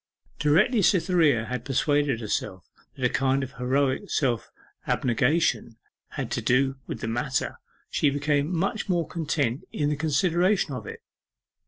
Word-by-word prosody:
Directly 165 - +3
Cytherea 170 - +3
had 125 +1 -4
persuaded 140 -1 +1
herself 95 -3 -3 0.3
that 130 - -2
a - - +4
kind 135 +1 +1
of 130 - -6
heroic 135 +8 0
self 125 -6 0 0.4
abnegation 125 -1 +1 0.4
had 135 -5 -4
to 120 - -1
do 135 +3 +2
with - - -6
the - - -3
matter, 130 +4 -2 0.3
she 145 - +2
became 145 +2 0
much 195 +5 -1
more 170 -4 +1
content 145 -6 -1
in 145 -1 -1
the 150 - 0
consideration 165 +4 +1
of 120 -5 -6
it. - - -8
140 Hz, 145 wpm, -26 LUFS, 125-160 Hz, 0.4 s, a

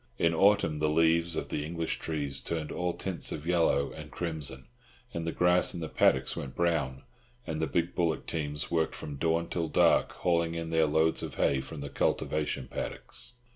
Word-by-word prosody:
In 85 0 +3
autumn, 100 -4 +3
the 75 0 +2
leaves 80 +1 +3
of - - -3
the 75 - -2
English 85 +1 -2
trees 70 -4 -2
turned 80 -2 -3
all 90 -1 -1
tints 95 -3 -3
of 75 - -5
yellow 85 -5 +2
and - - -9
crimson, 75 -6 -5 0.5
and 85 0 -3
the - - 0
grass 90 +1 +4
in - - -4
the 80 - -3
paddocks 65 0 +3
went 65 -2 -6
brown; 75 -6 0 0.4
and 80 0 -3
the 80 - +1
big 85 +1 0
bullock 85 -3 0
teams 75 -1 -3
worked 80 -2 +1
from 70 -2 -6
dawn 85 +2 +1
till 85 -1 -2
dark, 75 - +3
hauling 85 -1 +1
in 85 0 -4
their 80 -1 +3
loads 80 +2 +2
of - - -5
hay 70 -2 +2
from 75 +2 -8
the 70 - -5
cultivation 75 -4 -1
paddocks. 125 - -6
80 Hz, 190 wpm, -30 LUFS, 75-85 Hz, 0.5 s, grass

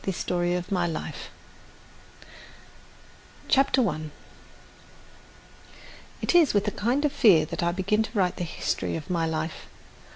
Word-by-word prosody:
THE 195 - -1
STORY 175 0 -1
OF 180 +1 -5
MY 180 -3 +1
LIFE 165 - -6 2.2
CHAPTER 265 -3 +3
I 155 -3 -4 2.1
It - - +1
is 330 -9 +5
with 205 - +2
a - - +1
kind 245 +9 0
of 295 - +1
fear 185 - +5
that 170 +2 -5
I 170 0 +1
begin 195 +4 0
to 220 0 -4
write 185 -2 +1
the - - -3
history 170 - -3
of 160 +1 -6
my 165 -2 0
life. 160 0 -4
180 Hz, 140 wpm, -26 LUFS, 170-220 Hz, 2.2 s, is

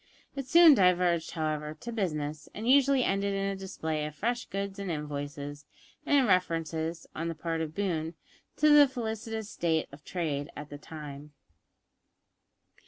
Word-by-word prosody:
It 275 -2 -4
soon 330 +2 +8
diverged, 180 - +3
however, 155 -1 -3
to 235 +10 -7
business, 155 -8 -3
and 220 +2 -4
usually 275 0 +5
ended 200 -1 0
in 195 0 -1
a 195 0 -1
display 160 -5 -3
of 150 - -9
fresh 240 +8 -1
goods 195 0 -4
and 200 -2 -4
invoices, 145 -1 -5 0.4
and 290 - +5
in 270 - +4
references, 165 -4 0
on 165 +1 -2
the 165 - -3
part 165 +1 -2
of 160 0 -4
Boone, 165 -5 -1 0.4
to 305 - +4
the 295 -1 +8
felicitous 225 -3 -4
state 160 -2 0
of 140 +1 -13
trade 150 -5 -3
at 150 0 -8
the 145 - -7
time. 150 -1 -9
170 Hz, 160 wpm, -29 LUFS, 150-210 Hz, 0.4 s, soon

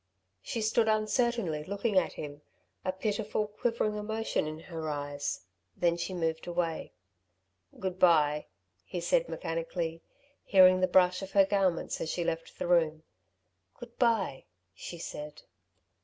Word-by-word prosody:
She 225 - -3
stood 220 +1 +3
uncertainly 215 - +1
looking 200 +4 -2
at 185 -2 +3
him, 145 -1 -7 0.4
a 185 - 0
pitiful, 205 +2 -1
quivering 215 0 -1
emotion 220 -5 -1
in 155 0 -5
her 160 -2 -5
eyes; 145 -1 -3 0.4
then 170 -1 +2
she 180 +2 -4
moved 160 -1 -2
away. 170 -2 -2 0.9
"Good 185 -1 -3
bye," 150 -4 +4 0.4
he - - -5
said, - - +1
mechanically, 165 0 -3 0.4
hearing 185 -2 +7
the 185 - +3
brush 180 0 +4
of 195 0 -7
her 195 -1 +6
garments 190 -4 0
as 160 - -2
she 175 - -1
left 165 0 -3
the - - -3
room. 160 -3 +2 0.7
"Good 240 -2 -12
bye," 225 - +1 0.3
she 170 - -8
said. 150 -2 -7
180 Hz, 140 wpm, -30 LUFS, 160-210 Hz, 0.9 s, hearing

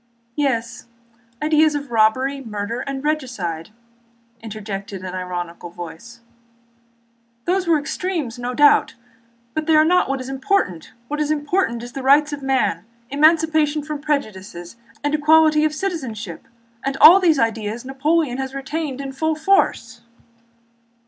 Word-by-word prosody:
"Yes: 235 -6 -2 0.6
ideas 310 0 +3
of 285 -3 -5
robbery, 255 +5 +2
murder, 215 +1 -4
and 270 +1 -5
regicide," 240 - -3
again 215 - -28 0.7
interjected 205 -3 -7
an 185 - -6
ironical 175 -2 -5
voice. 175 +8 -10 1.2
"Those 370 0 0
were 330 -2 +4
extremes, 295 -4 -3
no 245 +1 -4
doubt, 290 -1 +4 0.6
but 310 0 -3
they 320 - +4
are 310 0 +6
not 360 -1 +3
what 275 0 -1
is 255 - -6
most 270 - -5
important. 265 - -1 0.2
What 295 +3 -4
is 300 - -1
important 295 -5 0
are - - -6
the 270 +2 -7
rights 290 +3 +4
of 290 - -5
man, 260 -11 0 0.3
emancipation 310 0 +3
from 300 -1 -5
prejudices, 205 - -4 0.3
and 290 0 0
equality 305 0 +4
of 305 0 -1
citizenship, 260 - -5 0.4
and 275 0 -2
all 350 +7 +9
these 335 -5 +3
ideas 225 0 -2
Napoleon 270 0 0
has 265 0 -4
retained 275 0 -4
in 275 -1 -5
full 315 +4 -1
force." 390 +6 +1
275 Hz, 140 wpm, -21 LUFS, 225-310 Hz, 1.2 s, all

